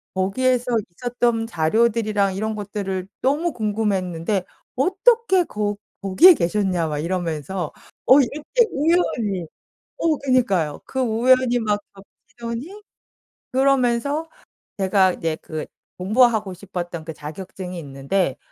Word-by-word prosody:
거기에서 245 +6 +1 0.3
있었던 240 -2 0
자료들이랑 210 +2 +1
이런 215 +2 -2
것들을 195 -2 -4
너무 300 +5 +1
궁금해했는데 200 -4 -1 0.3
"어떻게 380 - +3
거 210 0 -2 0.3
거기에 285 - +7
계셨냐." 180 - 0
막 150 -1 -3
이러면서 170 0 -3 0.4
어 265 - +8
이렇게 305 - +1
우연히 250 - +1 0.5
어 320 -3 +1
그러니까요. 215 - +1
그 265 - -4
우연이 245 +1 +3
막 210 -2 0 0.5
겹치더니 240 - -6 0.7
그러면서 270 +3 +1 0.5
제가 190 -1 +3
이제 160 -2 -2
그 155 -1 -5 0.3
공부하고 215 0 +2
싶었던 175 -3 -6
그 160 - -6
자격증이 180 +4 -8
있는데 140 +2 -2
210 Hz, 280 characters per minute, -22 LUFS, 185-255 Hz, 0.7 s, 어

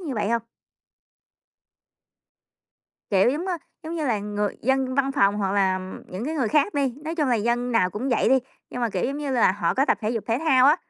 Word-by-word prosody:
như 300 -8 -4
vậy 210 -1 -1
hông? 230 0 0 2.7
Kiểu, 195 +4 +4
giống, 310 +7 -3
ơ, 360 -2 -2 0.2
giống 320 +1 -5
như 315 -3 -2
là, 230 -5 +1
người 205 0 -3
dân 265 +1 +1
văn 275 0 +1
phòng 200 -4 +3
hoặc 195 -2 -1
là 190 -2 +2 0.3
những 185 +5 -6
cái 310 +4 -3
người 260 -8 0
khác 300 - +2
đi, 275 -4 0
nói 320 +2 -3
chung 300 -5 0
là 245 - +3
dân 240 +3 0
nào 185 -6 +3
cũng 225 +8 -3
vậy 240 -3 +2
đi, 265 +2 +5 0.3
nhưng 250 - -5
mà, 235 -2 0
kiểu, 185 -3 -1
giống 275 +2 -2
như 290 -1 -3
là, 235 -7 +4
họ 205 - -1
có 270 - +3
tập - - +1
thể 215 -1 -1
dục 230 -3 -3
thể 230 +1 +1
thao 270 -5 +4
á 295 +3 +6
245 Hz, 230 wpm, -24 LUFS, 210-280 Hz, 2.7 s, á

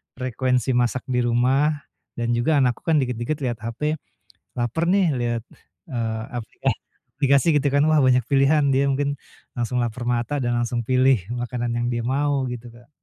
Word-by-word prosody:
frekuensi 130 0 0
masak 125 0 +1
di 125 - +2
rumah, 130 +6 +2 0.4
dan 120 0 -1
juga 120 +7 +2
anakku 125 +7 -1
kan 160 - +4
dikit-dikit 125 +4 -3
liat 120 -2 -2
hape, 140 +7 -3 0.6
laper 120 +8 0
nih 195 -2 +4
liat, 120 -1 -1 0.5
eee, 115 -3 -2
aplika 115 -3 -2 0.4
aplikasi 140 +2 +3
gitu 140 +1 +1
kan - - +4
wah 155 -1 +4
banyak 125 -1 +4
pilihan 140 +2 +4
dia 140 +1 +3
mungkin, 140 +1 0 0.4
langsung 125 +1 -2
laper 120 +1 -3
mata 120 +4 0
dan 120 0 0
langsung 120 0 -1
pilih 130 +1 +4 0.2
makanan 120 0 -3
yang 120 - -1
dia 120 0 -1
mau 140 +1 +1
gitu, 120 0 -7
Kak. 120 0 -18
125 Hz, 165 wpm, -23 LUFS, 120-140 Hz, 0.6 s, kan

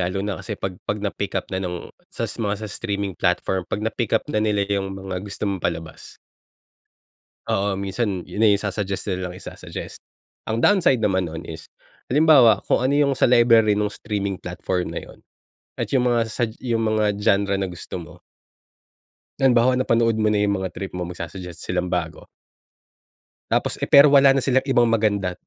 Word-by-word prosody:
lalo 95 +2 -3
na 105 -2 -2
kasi 105 -3 -6
'pag 95 -1 -4 0.2
'pag 105 - 0
na-pick-up 100 -1 -3
na 95 - -1
nung 90 -2 -5 0.2
sa - - -4
mga, 105 -1 -3
sa 110 - -5
streaming 100 -2 -3
platform, 90 +1 0
'pag 105 +1 -3
na-pick-up 110 0 0
na 105 - +1
nila 105 -2 +1
yung 95 -1 -2
mga 95 -1 -5
gusto 100 +1 -6
mong 100 -3 -2
palabas. 80 -2 -5 1.3
Oo, 100 0 0
minsan 100 -1 -2
yun 110 - -2
na 105 - +6
yung 100 - +2
isa-suggest 100 -1 -3
nila 90 -2 -3
ng - - -11
isa-suggest. - - -8 0.5
Ang 110 +1 0
downside 175 - +4
naman 95 -5 0
nun 80 - -7
is - - -9 0.4
halimbawa, 135 -7 +6
kung - - +2
ano 130 - +2
yung 140 -1 +3
sa - - +3
library 115 -3 +5
nung 105 0 0
streaming 100 -2 -3
platform 90 0 -3
na - - -4
yun - - -14 0.6
at - - -2
yung 125 -2 +3
mga 120 -1 +2
sug 115 -2 -1
yung 115 -3 -1
mga 105 -2 +1
genre 100 -1 +2
na 95 - -1
gusto 90 +1 -8
mo. 80 - -11 1.3
Halimbawa 125 -2 +4
napanood 115 -3 +2
mo 110 - +2
na 105 -1 +2
yung 100 -1 +1
mga 95 - -2
trip 95 - -5
mo, 90 -1 -4
magsa-suggest 90 0 -8
silang 90 0 -2
bago. 85 -3 -3 1.3
Tapos, - - 0
eh, - - -2
pero 140 0 +8
wala 140 -1 +7
na 130 - -1
silang 130 -1 +3
ibang 120 -2 +4
maganda, 105 -5 +1
100 Hz, 180 wpm, -22 LUFS, 95-115 Hz, 1.3 s, pero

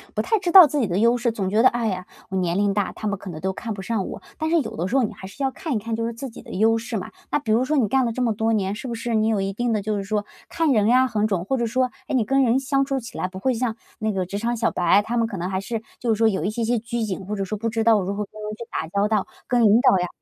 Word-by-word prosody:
不 - - +1
太 440 -2 +1
知 355 -2 -1
道 370 -3 +11
自 295 0 -1
己 225 - +1
的 175 +1 -1
优 235 +3 +4
势， 240 -1 0
总 200 -4 -3
觉 215 +4 +2
得： 255 - +7
“哎 235 -1 -2
呀， 185 -1 -4 0.2
我 190 - -2
年 175 0 0
龄 200 -1 +2
大， 205 -2 0
他 215 - -5
们 200 - 0
可 195 - -8
能 155 -2 -7
都 190 +2 -2
看 225 +2 -6
不 195 -2 -5
上 215 -3 -1
我。” - - -7 0.2
但 315 0 -1
是 335 0 +4
有 225 - -6
的 175 +3 -2
时 255 - -2
候 265 - +4
你 215 - -2
还 190 - -10
是 265 +8 -7
要 265 - +1
看 310 0 -4
一 - - +1
看 225 +2 -3
就 230 0 -2
是 - - -3
自 265 +4 -6
己 - - -11
的 - - -14
优 225 +4 +3
势 225 -1 -4
嘛， 185 - -6 0.2
那 - - +2
比 220 - -3
如 235 +3 +3
说 300 +2 0
你 230 -6 +3
干 265 +4 +2
了 235 - 0
这 250 +2 -2
么 230 -2 +2
多 225 +2 0
年， 200 -2 0
是 255 +4 -6
不 235 - -3
是 230 +1 -3
你 220 0 +2
有 215 -3 +1
一 195 0 -2
定 240 +2 -1
的 215 - +1
就 215 0 -1
是 200 - -2
说 205 0 -2 0.2
看 325 -3 +1
人 215 -3 +3
呀 255 +2 +5
很 215 -2 0
准， 185 -4 -1
或 265 - 0
者 235 -2 0
说， 255 +2 0 0.2
哎， - - -1
你 230 -4 +2
跟 275 0 +2
人 245 +2 +3
相 275 0 +1
处 270 -1 -1
起 230 - -10
来， 185 - 0
不 185 0 -10
会 260 +6 +1
像 230 -1 -1 0.2
那 215 0 0
个 190 -2 -1
职 200 +3 -4
场 235 +1 -1
小 220 - +1
白。 180 +3 +3
他 240 +2 -2
们 230 -1 +2
可 200 -4 -6
能 175 +2 -3
还 190 0 -1
是 225 +2 -4 0.2
就 240 - -3
是 215 - +1
说 225 0 +4
有 190 -6 0
一 200 - 0
些 230 +2 -2
些 235 0 +1
拘 230 0 -3
谨， 195 -2 -3
或 210 - -2
者 195 -1 -2
说 215 - -3
不 230 +2 -2
知 225 0 -1
道 220 -3 +4
如 195 +2 -3
何 210 -1 -3
跟 215 0 -11
人 210 0 -4
去 235 - -7
打 160 - -3
交 200 +4 +1
道， 210 -3 0 0.2
跟 245 -1 +2
领 220 +1 +6
导 255 -7 +5
呀 180 - -1
220 Hz, 380 characters per minute, -23 LUFS, 200-240 Hz, 0.2 s, 道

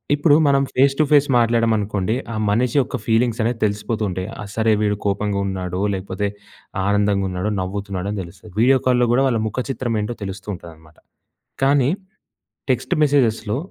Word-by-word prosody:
ఇప్పుడు 145 0 +4
మనం 140 -1 +3
face 135 +1 +3
to - - +6
face 145 -1 +5
మాట్లాడామనుకోండి, 110 -3 +1 0.2
ఆ - - -4 0.2
మనిషి 120 +4 +1
యొక్క 125 - -4
ఫీలింగ్స్ 115 +1 +2
అనేవి 115 +1 -1
తెలిసిపోతూ 105 +2 -2
ఉంటాయి. 95 0 -4 0.2
ఆ - - -7
సరే 110 -1 +3
వీడు 105 -1 +1
కోపంగా 100 0 -1
ఉన్నాడో 95 -1 -3
లేకపోతే, 95 +1 -3 0.6
ఆనందంగా 100 -1 +2
ఉన్నాడో, 90 +4 -2
నవ్వుతున్నాడో 100 0 -4
అని 105 - -3
తెలుస్తుంది. 90 +2 -14
వీడియో 130 +2 +5
కాల్‍లో 125 -1 +3
కూడా 130 +2 +3
వాళ్ళ 115 -3 0
ముఖచిత్రం 125 +1 -3
ఏంటో 105 +3 -4
తెలుస్తూ 95 0 -7
ఉంటుందనమాట. 80 -3 -15 0.7
కానీ 135 -1 +4 0.8
టెక్స్ట్ 130 - 0
మెసేజెస్‌లో 120 -6 +1
110 Hz, 155 wpm, -21 LUFS, 100-125 Hz, 0.8 s, to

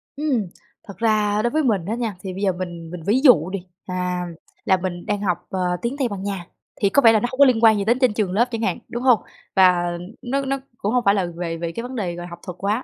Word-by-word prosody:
Ừm, 275 -9 0 0.4
thật 200 - -10
ra 215 -2 +2
đối 240 - +1
với 310 +1 +1
mình 205 -10 +1
á 220 +5 -2
nha, 230 -5 -3
thì 190 -1 -5
bây 190 - -6
giờ 195 - +3
mình 175 -2 -6
mình 180 -2 -7
ví 220 +6 +3
dụ 185 - +6
đi, 195 0 -3 0.3
à, 180 -1 -2 0.4
là 190 - +4
mình 175 -1 -5
đang 205 -1 -1
học, 180 -4 +1
ờ, 180 -1 -1
tiếng 240 +4 -2
Tây 270 -3 +1
Ban 200 -3 -6
Nha, 195 -4 -4 0.4
thì 200 - +4
có 280 - +4
vẻ 225 - +7
là 220 - +4
nó 245 - -1
hông 260 - -8
có 280 - +9
liên 235 -3 +2
quan 220 -2 +7
gì 200 - -1
đến 235 +4 +2
trên 255 -5 +3
trường 210 -4 -1
lớp 230 +5 +3
chẳng 230 - -3
hạn, 190 -6 0
đúng 240 +2 -4
hông? 250 -4 +5 0.4
Và 180 -2 +5 0.4
nó 275 +2 -1
nó 275 +1 0 0.2
cũng 205 - -2
hông 250 -1 +2
phải 200 - +5
là 195 -3 +1
về 165 -2 -3
về 170 0 -3
cái 230 - -5
vấn 255 +1 -7
đề, 180 -6 -2
gọi 175 0 -7
là, - - -9
học 170 0 -9
thuật 180 -1 -7
quá, 210 +6 -1
205 Hz, 285 wpm, -22 LUFS, 180-235 Hz, 0.4 s, có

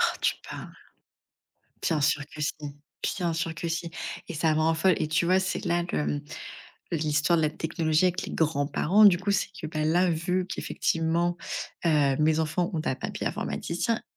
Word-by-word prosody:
Oh, - - +5 0.2
tu - - +2
parles! - - -7 1.1
Bien 160 -4 +1
sûr 150 0 +2
que 155 - -8
si 150 - +1 0.7
bien 175 -3 0
sûr 165 0 -2
que 165 - -4
si 170 +1 -3 0.4
et 175 - -5
ça 155 0 +2
me 155 - +1
rend 160 +1 +3
folle. 180 +3 +3
Et 155 - -1
tu 155 +2 +2
vois, 185 +2 +4
c'est 185 - -2
là, 175 -1 +1
le, - - +1
hem 145 -1 -1 0.7
l'histoire 155 +1 +2
de - - +2
la 155 - +3
technologie 160 +1 +1
avec 180 +1 +1
les - - -6
grands-parents, 160 +6 +3
du 190 -4 +7
coup, 200 +3 -1
c'est 200 - +1
que, - - -5
bah, 155 -1 -2
là, 175 +3 +3
vu 180 +3 0
qu'effectivement, 170 +1 0 0.5
heu, 145 -4 +3
mes 155 +1 +3
enfants 165 +3 0
ont 160 - -1
un - - +1
papy - - -5
informaticien, 220 +7 -2
165 Hz, 190 wpm, -27 LUFS, 155-175 Hz, 1.1 s, du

